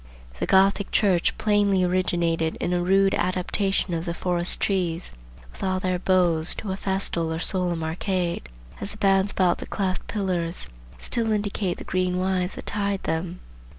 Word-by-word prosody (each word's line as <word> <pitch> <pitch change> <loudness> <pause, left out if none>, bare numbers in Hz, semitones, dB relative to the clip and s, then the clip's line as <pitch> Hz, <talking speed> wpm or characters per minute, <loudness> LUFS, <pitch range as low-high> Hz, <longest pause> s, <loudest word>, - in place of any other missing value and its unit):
The - - -1
Gothic 195 +1 +4
church 190 -5 +2
plainly 205 -3 +2
originated 170 -3 +1
in 175 - -1
a 175 - +1
rude 195 +2 +3
adaptation 185 +1 0
of 165 0 -2
the 170 -1 -3
forest 175 -1 0
trees, 180 -3 -1 0.4
with - - -10
all 185 -1 0
their 185 -1 -1
boughs, 175 -3 +2
to 205 - -5
a - - -1
festal 190 -4 -1
or 160 - -2
solemn 175 -2 +1
arcade; 175 - -2 0.3
as 200 - -5
the - - -12
bands 195 0 +3
about 180 -2 +2
the - - -7
cleft 185 -3 -2
pillars 180 -5 -2 0.3
still 225 - -1
indicate 205 -3 -1
the - - -8
green 185 -1 0
withes 185 0 0
that - - -8
tied 200 -1 -2
them. 170 +2 -3
185 Hz, 165 wpm, -25 LUFS, 175-195 Hz, 0.4 s, Gothic